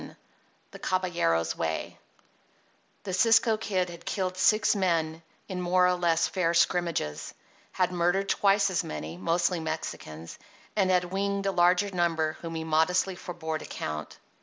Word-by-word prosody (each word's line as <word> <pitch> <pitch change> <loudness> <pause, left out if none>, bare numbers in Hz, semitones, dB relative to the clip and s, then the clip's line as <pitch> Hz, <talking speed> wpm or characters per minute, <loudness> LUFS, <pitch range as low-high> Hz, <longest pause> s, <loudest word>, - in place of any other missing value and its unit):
XI - - -11 0.6
THE - - -11
CABALLERO'S 170 - 0
WAY 80 -1 -3 1.0
The 190 - -5
Cisco 225 +3 +4
Kid 190 -5 -1
had 170 - -11
killed 185 -2 -2
six 215 +4 +3
men 165 -4 0 0.3
in 185 -2 -4
more 180 +1 +3
or 180 - +3
less 170 -2 +2
fair 170 -3 0
scrimmages, 170 - 0 0.4
had 180 -1 +1
murdered 180 +3 +1
twice 200 0 +3
as 180 - 0
many 75 +1 -6
(mostly 170 - 0
Mexicans), 80 - -6 0.4
and 195 -3 +2
had 180 -1 +3
winged 200 +1 -1
a 195 - +2
larger 180 +2 +3
number 165 -3 0
whom 165 -1 -6
he 160 - -3
modestly 160 +4 +1
forbore 160 -3 -5
to - - -9
count. 75 0 -6
180 Hz, 150 wpm, -28 LUFS, 160-190 Hz, 1.0 s, Cisco